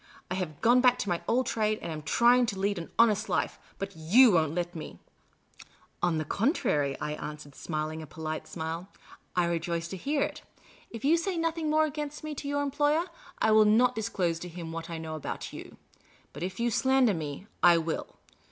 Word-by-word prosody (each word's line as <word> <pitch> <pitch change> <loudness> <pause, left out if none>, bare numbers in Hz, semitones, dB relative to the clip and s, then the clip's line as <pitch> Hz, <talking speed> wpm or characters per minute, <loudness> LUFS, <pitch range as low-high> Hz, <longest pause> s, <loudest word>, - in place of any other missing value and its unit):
" - - -25
I - - +1
have 180 -6 -4
gone 245 +2 +5
back 250 -1 +5
to 200 - -3
my 175 -1 0
old 255 +2 +2
trade, 215 -2 0
and - - -5
am 155 -1 -5
trying 240 +10 +4
to 205 -4 -3
lead 200 -1 0
an 165 - -7
honest 220 -1 +4
life; - - -1 0.2
hxxiyoii 195 +5 +4
won't 160 -2 +2
let 175 -1 -2
me." 160 - -8 1.0
On 175 -2 +2
the 155 - -2
contrary," 195 - 0
I 150 - -3
answered, 150 -1 -7
smiling 155 +1 -4
a 155 - -9
polite 155 +1 -5
smile, 165 +3 -5 0.2
" - - -24
I 180 -1 +3
rejoice 170 0 -2
to 190 - -5
hear 285 - 0
it. - - -4 0.5
If 230 +2 -7
you 320 +4 +5
say 360 +1 -2
nothing 330 -1 -1
more 310 +1 +4
against 300 0 -5
me 310 -1 -4
to 285 0 -6
your 285 0 0
employer, 295 +4 +1 0.3
I 220 - +2
will 215 0 +6
not 235 +4 +4
disclose 185 -7 -1
to 180 - -7
him 165 -1 -7
what 165 +1 -6
I 165 - -4
know 160 -1 -6
about 155 - -5
you. - - -10 0.6
But - - -9
if 185 +3 -4
you 235 0 +1
slander 260 -1 +3
me, 155 +1 -5 0.2
I 175 -1 +7
will. 165 -1 -2
190 Hz, 205 wpm, -29 LUFS, 165-250 Hz, 1.0 s, I